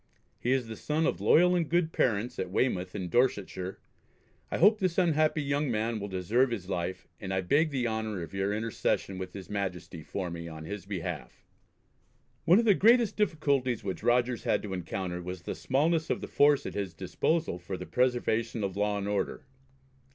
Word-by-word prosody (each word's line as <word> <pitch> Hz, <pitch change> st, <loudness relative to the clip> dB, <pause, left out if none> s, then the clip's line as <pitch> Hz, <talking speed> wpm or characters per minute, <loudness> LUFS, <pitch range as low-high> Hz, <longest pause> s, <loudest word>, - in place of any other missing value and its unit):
He 125 Hz, -, 0 dB
is 130 Hz, -2 st, +2 dB
the 115 Hz, 0 st, -7 dB
son 155 Hz, +7 st, -1 dB
of -, -, 0 dB
loyal 180 Hz, +2 st, +5 dB
and 170 Hz, -3 st, 0 dB
good 170 Hz, -1 st, +1 dB
parents 120 Hz, +1 st, 0 dB
at 95 Hz, -, -2 dB
Weymouth 90 Hz, -3 st, 0 dB
in 95 Hz, -3 st, -3 dB
Dorsetshire. 95 Hz, -4 st, 0 dB, 0.7 s
I -, -, -2 dB
hope 210 Hz, +5 st, +5 dB
this 185 Hz, -3 st, 0 dB
unhappy 155 Hz, -4 st, +2 dB
young 140 Hz, 0 st, 0 dB
man 110 Hz, 0 st, -1 dB
will 100 Hz, -, -4 dB
deserve 105 Hz, +8 st, +1 dB
his 105 Hz, -6 st, -4 dB
life, 90 Hz, -1 st, -3 dB
and 95 Hz, -2 st, -5 dB
I 95 Hz, 0 st, +1 dB
beg 145 Hz, -, +2 dB
the 130 Hz, -4 st, -1 dB
honour 110 Hz, -4 st, -2 dB
of 80 Hz, -, -9 dB
your 95 Hz, +1 st, 0 dB
intercession 105 Hz, -3 st, -1 dB
with 95 Hz, -1 st, -6 dB
his 95 Hz, -3 st, -8 dB
Majesty 90 Hz, -5 st, -4 dB
for 85 Hz, +4 st, -4 dB
me 85 Hz, 0 st, -6 dB
on 80 Hz, -1 st, -8 dB
his 100 Hz, +2 st, -6 dB
behalf." 95 Hz, -5 st, -5 dB, 1.0 s
One 180 Hz, -, +6 dB
of 230 Hz, -, +3 dB
the 210 Hz, -, +6 dB
greatest 230 Hz, +3 st, +4 dB
difficulties 140 Hz, -, +1 dB
which 95 Hz, -2 st, -4 dB
Rogers 120 Hz, +1 st, +2 dB
had -, -, +1 dB
to 100 Hz, -3 st, -5 dB
encounter 90 Hz, 0 st, -4 dB
was 90 Hz, 0 st, -6 dB
the -, -, -3 dB
smallness 160 Hz, +5 st, +1 dB
of -, -, 0 dB
the -, -, -6 dB
force 145 Hz, -1 st, +4 dB
at -, -, -4 dB
his 95 Hz, -4 st, -4 dB
disposal 95 Hz, -, -1 dB
for 90 Hz, +2 st, -5 dB
the 90 Hz, -, -7 dB
preservation 120 Hz, -2 st, 0 dB
of 95 Hz, -1 st, -2 dB
law 105 Hz, 0 st, 0 dB
and 100 Hz, 0 st, -3 dB
order. 105 Hz, -1 st, -2 dB
110 Hz, 195 wpm, -29 LUFS, 95-145 Hz, 1.0 s, One